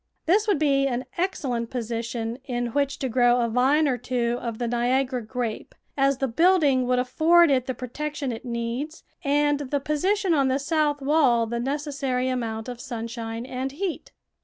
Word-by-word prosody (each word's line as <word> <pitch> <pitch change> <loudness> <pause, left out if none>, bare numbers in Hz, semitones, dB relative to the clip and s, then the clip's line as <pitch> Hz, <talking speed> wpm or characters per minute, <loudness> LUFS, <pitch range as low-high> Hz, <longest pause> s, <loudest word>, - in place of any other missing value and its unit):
This 415 +6 +3
would 410 - +3
be 275 -2 +2
an 255 -1 -2
excellent 270 - -2
position 230 0 -3
in 245 -2 -2
which 285 -1 0
to 265 - -2
grow 245 0 +3
a 235 - +1
vine 265 +6 +3
or 250 -3 0
t^vo 240 -1 -1
of 235 -2 -5
the 240 - -2
Niagara 250 +2 0
grape, 230 0 -5 0.2
as 275 -1 +2
the 270 - 0
building 285 -2 +3
would 250 0 +2
afford 315 +6 +4
it 255 -2 +1
the 260 - -2
protection 275 +2 -4
it 225 - -6
needs 240 +6 -4 0.2
and 290 0 +2
the 285 0 -2
position 365 +7 +1
on 275 -3 +3
the 260 0 +2
south 290 -1 0
wall 270 -6 +3
the 235 +1 -3
necessary 270 -1 -1
amount 225 -3 -3
of 245 -1 -6
sunshine 230 -1 -5
and 260 +1 -4
heat. 355 +2 -4
260 Hz, 175 wpm, -25 LUFS, 240-290 Hz, 0.2 s, afford